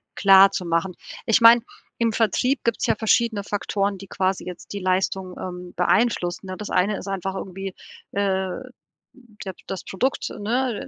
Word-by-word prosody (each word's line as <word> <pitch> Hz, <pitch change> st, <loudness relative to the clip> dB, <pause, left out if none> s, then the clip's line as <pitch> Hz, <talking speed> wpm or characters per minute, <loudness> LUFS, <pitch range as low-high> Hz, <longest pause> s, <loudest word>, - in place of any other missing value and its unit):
klarzumachen. 190 Hz, -3 st, +4 dB, 0.3 s
Ich 225 Hz, +2 st, +3 dB
meine, 230 Hz, +1 st, +8 dB, 0.4 s
im 230 Hz, -1 st, +1 dB
Vertrieb 245 Hz, +5 st, +1 dB
gibt's 235 Hz, -1 st, 0 dB
ja 225 Hz, -, +3 dB
verschiedene 220 Hz, -1 st, +1 dB
Faktoren, 200 Hz, -1 st, -1 dB
die 195 Hz, +1 st, -11 dB
quasi 190 Hz, 0 st, -1 dB
jetzt 180 Hz, -1 st, -9 dB
die 200 Hz, -, -3 dB
Leistung, 185 Hz, 0 st, -1 dB
ähm, 180 Hz, -1 st, -7 dB
beeinflussen, 180 Hz, -1 st, +1 dB
ne? 185 Hz, 0 st, -6 dB
Das 210 Hz, -, -6 dB
eine 195 Hz, +3 st, +1 dB
ist -, -, -8 dB
einfach 195 Hz, -1 st, -3 dB
irgendwie, 195 Hz, 0 st, -6 dB, 0.4 s
äh, 190 Hz, -1 st, 0 dB, 1.0 s
der 190 Hz, -, -4 dB
das 190 Hz, -, -5 dB
Produkt, 255 Hz, +8 st, -1 dB
ne, 235 Hz, +2 st, -1 dB
195 Hz, 150 wpm, -23 LUFS, 185-220 Hz, 1.0 s, meine